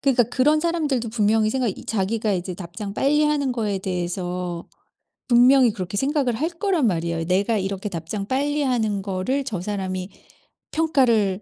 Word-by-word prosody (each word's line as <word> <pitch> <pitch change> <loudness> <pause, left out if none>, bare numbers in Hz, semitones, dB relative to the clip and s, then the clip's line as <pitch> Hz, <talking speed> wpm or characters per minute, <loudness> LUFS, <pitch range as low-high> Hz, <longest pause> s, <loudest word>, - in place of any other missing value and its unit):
그러니까 265 -3 +3
그런 265 +6 +2
사람들도 300 -8 0
분명히 215 -1 +2
생각이 250 -4 0
이 - - -11
자기가 215 +1 0
이제 180 -1 -3
답장 195 +3 -7
빨리 295 +5 +2
하는 290 -3 +1
거에 215 -5 -1
대해서 180 -1 -4 0.6
분명히 250 0 +6
그렇게 200 -2 -5
생각을 270 -1 +1
할 305 +8 -1
거란 345 -3 0
말이에요. 170 -3 -1
'내가 195 +6 +1
이렇게 195 +1 -3
답장 195 +3 -5
빨리 290 +4 0
하는 220 -6 0
거를 195 +8 -1
저 210 -9 -3
사람이 185 -1 -3 0.6
평가를 235 -11 +2
220 Hz, 365 characters per minute, -23 LUFS, 190-270 Hz, 0.6 s, 분명히